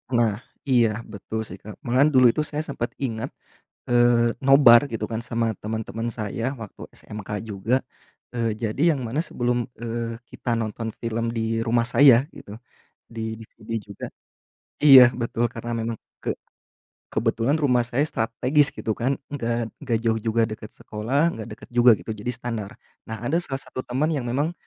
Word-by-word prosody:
Nah, 115 -2 +2 0.2
iya, 115 -4 +2
betul 110 +1 -6
sih, 95 -2 -10
Kak. 105 0 -10
Malahan, 130 +5 +4
dulu 125 -2 +7
itu - - -4
saya 150 0 -2
sempat 130 -5 -4
ingat, 120 -1 -3 0.6
eee, 120 -1 +4
nobar, 135 -2 +8
gitu 110 -1 -3
kan, 115 +1 -4
sama 115 -3 -1
temen-temen 110 +1 -3
saya, 115 +4 -3
waktu 105 - -10
SMK 105 -1 -7
juga. 110 +4 -1 0.6
Eee, 115 -2 0
jadi, 120 +10 +1
yang 140 - -3
mana 125 +5 -2
sebelum, 120 -1 -1 0.2
eee, 115 0 -4
kita 120 - -4
nonton 110 +1 -4
film 115 0 -2
di 115 0 -1
rumah 115 +1 +1
saya, 135 +1 +6
gitu, 100 - -11 0.6
di 110 -1 -4
DVD 110 0 -14 0.2
juga - - -7 0.8
iya 135 -4 +11
betul, 120 -1 -1
karena 120 +1 -6
memang 115 -1 -3 0.3
ke - - 0 0.8
kebetulan 115 +5 +1
rumah 125 -4 +3
saya 140 +5 +1
strategis, 130 +2 +1
gitu 110 - -1
kan. 135 +3 +1 0.2
Enggak 115 -3 -2
enggak 120 -6 0
jauh 110 -1 +2
juga, 115 +1 +1
deket 110 0 -7
sekolah, 135 +10 0
enggak 110 0 -7
deket - - -12
juga, 120 0 +7
gitu, 110 - -6
jadi 105 +3 -7
standar. 115 -4 -5 0.3
Nah, 110 - -4
ada 145 +7 +1
salah 135 -5 -5
satu - - -6
temen 135 +5 +1
yang 135 -5 -2
memang 145 +7 0
115 Hz, 165 wpm, -24 LUFS, 110-130 Hz, 0.8 s, iya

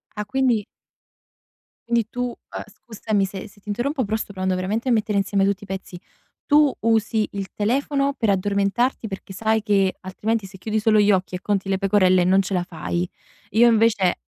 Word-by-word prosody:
Ah, 210 - -3
quindi 240 -1 +1 1.2
quindi 235 -2 +1
tu 245 - -4
uhm, - - -9
scusami 215 -3 -2
se 195 +2 -7
se 205 0 -20
ti 205 - -32
interrompo, 255 +6 -1
però 220 +2 -1
sto 215 - -5
provando 185 -1 -1
veramente 210 +7 -2
a - - +3
mettere 215 -2 +1
insieme 195 0 +1
tutti 200 +1 -1
i - - -11
pezzi. 190 -2 -6 0.5
Tu 295 -1 +5
usi 220 -1 +1
il 200 -1 -4
telefono 275 +6 0
per 225 - 0
addormentarti 200 +5 +1
perché 195 -1 -8
sai 220 +3 +1
che 195 -3 +2
altrimenti 210 +3 -2
se 190 0 -11
chiudi 215 +3 -2
solo 215 0 +3
gli 210 0 +5
occhi 185 -2 0
e 180 - -6
conti 195 -1 -1
le 190 - +1
pecorelle 185 -2 +3
non 190 +2 +4
ce 195 +1 -4
la 180 -2 +1
fai. 175 0 -3 0.4
Io 230 +4 +5
invece 215 -5 +3
205 Hz, 190 wpm, -22 LUFS, 190-225 Hz, 1.2 s, Tu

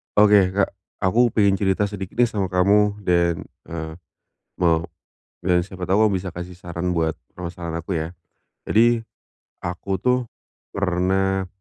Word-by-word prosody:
Oke 100 -3 +5
Kak. 100 0 +2 0.3
Aku 110 +6 +4
pengen 100 -3 +3
cerita 100 +1 +1
sedikit 95 -2 -6
nih 120 - +3
sama 100 -4 -1
kamu, 100 +3 +3
dan, 85 -2 +2 0.2
eee, 80 -1 -6 0.6
mau, 85 -2 +3 0.6
eee, 90 -1 +3
siapa 90 -2 -7
tahu 105 +3 +4
bisa 95 -1 -2
kasih 90 0 -7
saran 85 0 -3
buat 80 -2 0 0.2
permasalahan 85 -2 -5
aku 85 +2 -4
ya. 80 +1 -2 0.5
Jadi, 115 +1 +3 0.6
aku 90 +2 -3
tuh 125 +7 +2 0.6
pernah, 95 0 +1
95 Hz, 135 wpm, -23 LUFS, 85-100 Hz, 0.6 s, Oke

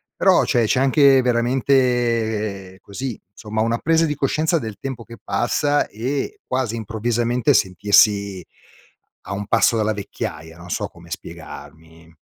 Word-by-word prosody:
però - - +4
c'è 120 - +2
c'è 125 +4 +1
anche 135 0 +5
veramente 120 -5 0
così, 120 +3 -6
somma 110 +1 -5
una 115 +1 +1
presa 165 0 +2
di 150 - -2
coscienza 155 +4 +1
del 110 -6 -7
tempo 130 -4 -6
che 115 0 -12
passa 145 +4 0
e 130 +6 -4
quasi 125 -3 -1
improvvisamente 120 +4 0
sentirsi 100 0 +3 0.8
a - - -6
un 100 0 -5
passo 115 +1 +3
dalla 110 0 +1
vecchiaia, 80 -5 -6
non 90 +1 -12
so - - -2
come - - -17
spiegarmi. 80 +3 -11
115 Hz, 135 wpm, -21 LUFS, 100-130 Hz, 0.8 s, anche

